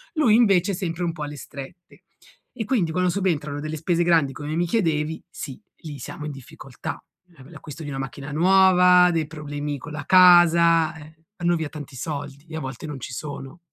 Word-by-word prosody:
Lui 245 -9 +4
invece 200 -5 +3
è - - -2
sempre 175 -1 -3
un 170 - 0
po' 155 -2 -6
alle 145 0 -6
strette, 140 +7 -11 0.5
e 230 -3 -4
quindi 200 -8 0
quando 180 +1 +1
subentrano 155 -7 -1
delle 155 +1 -4
spese 170 +2 0
grandi, 165 -5 +3
come 145 +3 -5
mi 175 - +1
chiedevi, 160 -5 -1
sì, 135 -5 -8 0.2
lì 150 -4 -9
siamo 150 +3 -7
in 150 - -4
difficoltà: 135 -3 -9 0.3
la 130 - -15
l'acquisto 155 +1 -10
di - - -6
una 135 - -5
macchina 135 +1 -6
nuova, 180 +1 +5
dei 160 -2 0
problemi 145 -2 -5
con 150 +4 -9
la 150 -1 -6
casa, 170 -3 +6
eh 155 0 -13 0.3
vanno 175 0 +2
via 160 -2 -4
tanti 145 -3 -9
soldi 140 0 -6
e 160 - -6
a - - -3
volte 130 0 -7
non 145 -3 -7
ci 120 - -7
sono. 140 +2 -7
160 Hz, 195 wpm, -23 LUFS, 145-175 Hz, 0.5 s, casa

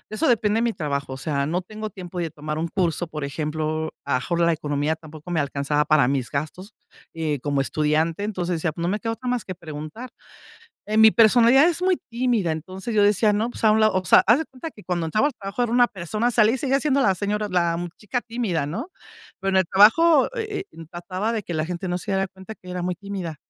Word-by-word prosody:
eso 320 - +1
depende 220 -3 +2
de - - +1
mi 235 -1 +1
trabajo, 140 -6 -3
o - - -6
sea, 140 0 -1
no 175 +4 -1
tengo 215 +3 -7
tiempo 180 -2 -8
de 170 -2 -2
tomar 150 0 -5
un 165 - -1
curso, 175 -1 -1
por 150 -2 -6
ejemplo, 155 +2 -3
a 140 - -4
lo - - +4
mejor 170 +6 -2
la 170 0 +4
economía 150 0 -1
tampoco 155 +1 -11
me 165 - +1
alcanzaba 145 +1 0
para 155 -5 +4
mis 130 -4 -1
gastos, 180 - -5 0.4
eh, 155 -3 -2
como 140 -1 0
estudiante, 155 +6 0
entonces 180 -4 -2
decía: 160 -1 -2
"No 170 0 -2
me 210 +3 -1
queda 225 -1 -2
otra 250 +2 -5
más 245 -5 -1
que 185 - -6
preguntar", 155 +9 -8 0.8
eh, 215 +1 -1
mi 220 0 +8
personalidad 240 +5 +6
es 345 0 0
muy 370 0 +2
tímida, 235 -7 0
entonces 185 +8 -6
yo 210 - +4
decía: 210 +1 +4
"No, 215 +3 0
pues 245 - -7
a 215 - +6
un 220 +1 +3
lado", 215 -1 +3
o 185 0 0
sea, - - +6
haz 230 +8 +5
de - - -2
cuenta 270 +3 -8
que 210 - -16
cuando 175 -3 -2
entraba 215 - +2
al - - -6
trabajo 205 +1 -4
era 235 - -1
una 245 0 +5
persona, 215 +4 -2
salí 220 -2 +4
y 260 - -1
seguía 270 +1 +1
siendo 280 -1 +1
la 195 -8 +3
señora, 210 +2 -2
la 170 -3 +1 0.2
chica 235 +4 -3
tímida 225 -11 -2
¿no?, 225 - -5 0.5
pero 195 - -2
en 190 - +2
el 190 - +4
trabajo, 260 - +5
eh 430 -4 -3
eh, 165 - -11
trataba 185 +5 -3
de 220 -2 -2
que 175 - -6
la 155 0 0
gente 180 +2 -5
no 175 - -1
se 190 +3 -5
diera 195 0 0
cuenta 190 +4 -11
que 185 - -16
era 180 0 -4
muy 180 +1 -1
tímida, 190 -5 -6
185 Hz, 245 wpm, -23 LUFS, 160-225 Hz, 0.8 s, mi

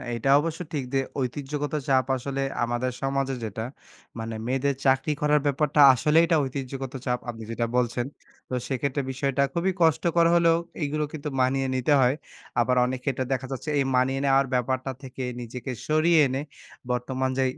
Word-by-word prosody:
এটা 115 +4 -1
অবশ্য 165 +1 -3
ঠিক 145 -3 -1
যে, 135 - +3 0.2
ঐতিহ্যগত 145 +3 -3
চাপ 130 -2 +3
আসলে 135 +2 -3 0.2
আমাদের 120 +2 -1
সমাজে 135 0 0
যেটা 110 +1 -4 0.5
মানে 115 0 -4
মেয়েদের 135 +2 0
চাকরি 135 +3 +3
করার 150 0 +3
ব্যাপারটা 145 +1 +2
আসলেই 150 +6 +4
এটা 165 -1 +2
ঐতিহ্যগত 135 -1 -5
চাপ 125 -1 0
আপনি 115 -1 -6
যেটা 115 +1 -1
বলছেন। 120 0 0 0.4
তো - - -6
সেক্ষেত্রে 140 +1 -1
বিষয়টা 135 +1 0
খুবই 175 +3 +1
কষ্টকর 165 +1 +3
হলেও 170 -1 +4 0.3
এগুলো 150 +1 -1
কিন্তু 150 -1 -4
মানিয়ে 135 +1 +1
নিতে 130 +3 +2
হয়। 125 +2 +3 0.4
আবার 125 +1 +2
অনেকে 130 +2 -4
এটা 130 - -2
দেখা 130 0 -3
যাচ্ছে 135 +3 -4
এই - - +3
মানিয়ে 130 +1 +2
নেওয়ার 135 0 +4
ব্যাপারটা 130 +1 0
থেকে 130 0 -6 0.2
নিজেকে 125 +2 -6 0.2
সরিয়ে 155 +2 +4
এনে 135 +1 -2 0.5
বর্তমান 130 +1 -1
যে, 135 - +3
135 Hz, 165 wpm, -26 LUFS, 125-145 Hz, 0.5 s, আসলেই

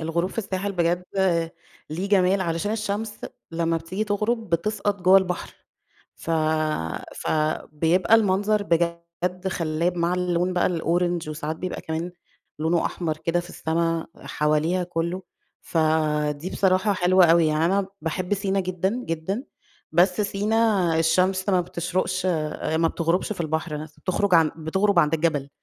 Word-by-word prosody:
الغروب 170 +3 -1
في - - -8
الساحل 200 -1 -2
بجد 175 0 0 0.9
ليه 180 +6 -3
جمال، 195 -1 +3
علشان 170 +3 -1
الشمس 215 0 -3 0.3
لمّا 165 0 0
بتيجي 180 +6 -3
تغرب 215 +1 -1
بتسقط 205 +3 0
جوّه 185 +2 +7
البحر، 180 -2 -4 0.6
ف 165 - -5 0.8
فبيبقى 160 +5 +1
المنظر 205 0 +2
بجد 170 +2 -1
خلّاب 170 0 -1
مع 170 +1 +1
اللون 180 0 0
بقى 175 - +2
الأورانج 175 -1 0
وساعات 155 +1 -4
بيبقى 180 +2 -5
كمان 165 +2 -4 0.5
لونه 165 +2 +1
أحمر 160 -3 -2
كده 165 +2 0
في 175 - -8
السما 165 0 -1
حواليها 155 +4 0
كلّه، 170 +1 -3 0.4
فدي 155 0 0
بصراحة 190 +2 +2
حلوة 185 -1 +5
أوي، 165 -1 +5
يعني 155 +1 +1
أنا 195 +2 +1
باحب 180 +4 -2
سينا 195 -1 0
جدًا، 190 +6 -1
جدًا، 165 +9 -3 0.5
بس 180 +4 +3
سينا 205 -4 +1
الشمس 185 +4 +2
ما 185 -2 +3
بتشرقش 175 +2 -2 0.5
ما 165 +1 +3
بتغربش 170 +5 0
في 175 - -4
البحر 160 0 -2
نفْسه، 155 -1 -12
بتخرج 180 -4 +3
بتغرب 190 +4 +2
عند 155 -1 +3
الجبل، 155 -4 0
175 Hz, 135 wpm, -24 LUFS, 165-190 Hz, 0.9 s, جوّه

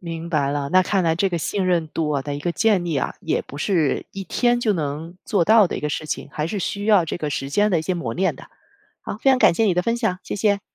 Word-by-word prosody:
明 165 -1 -6
白 145 -4 +1
了， 140 -1 -2
那 185 0 +5
看 195 0 0
来 160 - +2
这 195 +4 +1
个 175 - -2
信 190 +3 -1
任 170 -3 +1
度 155 0 -2
啊 140 -2 0
的 145 0 -4
一 145 - -5
个 175 +2 -1
建 205 -4 +2
立 165 -4 -1
啊， - - -2
也 - - -1
不 140 - -11
是 160 -3 0
一 195 0 -6
天 240 +6 +1
就 220 -3 +2
能 155 +1 -4
做 185 -5 +1
到 215 -1 +6
的 - - -4
一 - - -5
个 150 - -2
事 150 +1 -3
情， 145 - -4
还 150 +1 -2
是 200 +4 -3
需 200 +2 -3
要 205 -6 +4
这 160 - -4
个 150 -3 -3
时 135 -1 -3
间 205 +7 +2
的 170 - +2
一 - - -3
些 185 +2 -1
磨 125 -10 -3
练 185 +1 0
的。 - - -12 0.6
好， - - -5
非 270 - +5
常 260 - +4
感 210 - +5
谢 225 - +2
你 190 -5 +2
的 180 - +1
分 230 +3 0
享， 215 -6 -1
谢 - - -5
谢。 205 -1 +1
175 Hz, 320 characters per minute, -22 LUFS, 155-200 Hz, 0.6 s, 到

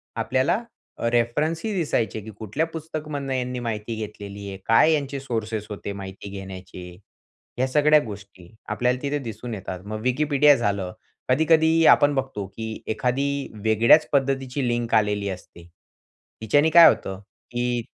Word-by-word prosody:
आपल्याला 130 - +1 0.5
रेफरन्सही 155 - 0
दिसायचे 145 - -1
की 110 - -10
कुठल्या 110 +10 -1
पुस्तकामधून 150 -4 -5
यांनी 125 -1 -2
माहिती 115 -1 -4
घेतलेली 100 -1 -9
आहे, 95 - -7
काय 115 +8 +5
यांचे 140 -2 -2
सोर्सेस 110 -5 -3
होते 100 -1 -5
माहिती 100 0 -8
घेण्याचे? 95 -2 -9 0.7
ह्या 130 +1 +1
सगळ्या 150 +2 +4
गोष्टी 100 -4 -11 0.2
आपल्याला 125 +1 0
तिथे 145 +1 -1
दिसून 115 -1 -7
येतात. 95 -3 -6
मग 110 +2 -6
Wikipedia 145 +2 +4
झालं, 100 -6 -1 0.4
कधी-कधी 160 +3 +4
आपण 145 0 +2
बघतो 130 -7 -3
की 110 -1 -5
एखादी 125 +5 0 0.4
वेगळ्याच 115 +8 +5
पद्धतीची 135 -1 0
लिंक 120 -1 -1
आलेली 105 -2 +1
असते. 90 -2 -9 0.8
तिच्याने 145 +8 +3
काय 170 +1 +9
होतं 95 0 -2 0.3
की 120 0 -1
120 Hz, 135 wpm, -24 LUFS, 105-145 Hz, 0.8 s, काय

